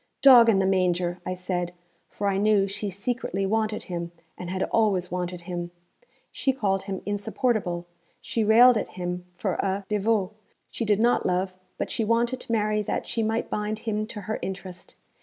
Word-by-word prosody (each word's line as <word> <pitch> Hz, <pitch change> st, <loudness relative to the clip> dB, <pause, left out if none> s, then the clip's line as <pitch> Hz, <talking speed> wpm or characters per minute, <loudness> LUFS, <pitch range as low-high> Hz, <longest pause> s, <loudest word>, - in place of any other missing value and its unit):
'Dog 245 Hz, -4 st, +9 dB
in 210 Hz, -, +4 dB
the 190 Hz, -, +2 dB
manger!' 180 Hz, -2 st, +1 dB
I 185 Hz, -, -2 dB
said, 180 Hz, -1 st, -3 dB, 0.4 s
for 205 Hz, -, -5 dB
I 195 Hz, -1 st, +1 dB
knew 205 Hz, -1 st, +3 dB
she 200 Hz, +1 st, -3 dB
secretly 195 Hz, 0 st, -2 dB
wanted 215 Hz, +1 st, 0 dB
him, 170 Hz, -1 st, -5 dB, 0.2 s
and 180 Hz, -, -7 dB
had 185 Hz, +1 st, -1 dB
always 195 Hz, -6 st, +2 dB
wanted 180 Hz, -1 st, -3 dB
him. 175 Hz, -1 st, -5 dB, 0.6 s
She 270 Hz, -, 0 dB
called 195 Hz, -6 st, 0 dB
him 195 Hz, -2 st, -5 dB
'insupportable'; 205 Hz, -3 st, -1 dB, 0.3 s
she 225 Hz, -, -1 dB
railed 230 Hz, +2 st, +7 dB
at -, -, -6 dB
him 180 Hz, 0 st, -3 dB
for 190 Hz, +1 st, -1 dB
a 195 Hz, +1 st, -1 dB
'devot.' 210 Hz, -1 st, +1 dB, 0.4 s
She 230 Hz, -, -3 dB
did 210 Hz, -1 st, +2 dB
not 240 Hz, +2 st, +3 dB
love; 185 Hz, +1 st, 0 dB, 0.2 s
but -, -, -3 dB
she 225 Hz, -, 0 dB
wanted 235 Hz, +3 st, +1 dB
to -, -, -7 dB
marry 215 Hz, -1 st, +1 dB
that 210 Hz, -, -2 dB
she 230 Hz, -, -2 dB
might 225 Hz, +1 st, -1 dB
bind 210 Hz, +1 st, -2 dB
him 215 Hz, -1 st, -1 dB
to 215 Hz, -2 st, -7 dB
her 215 Hz, +3 st, -3 dB
interest. 185 Hz, -1 st, -7 dB
200 Hz, 180 wpm, -26 LUFS, 180-220 Hz, 0.6 s, Dog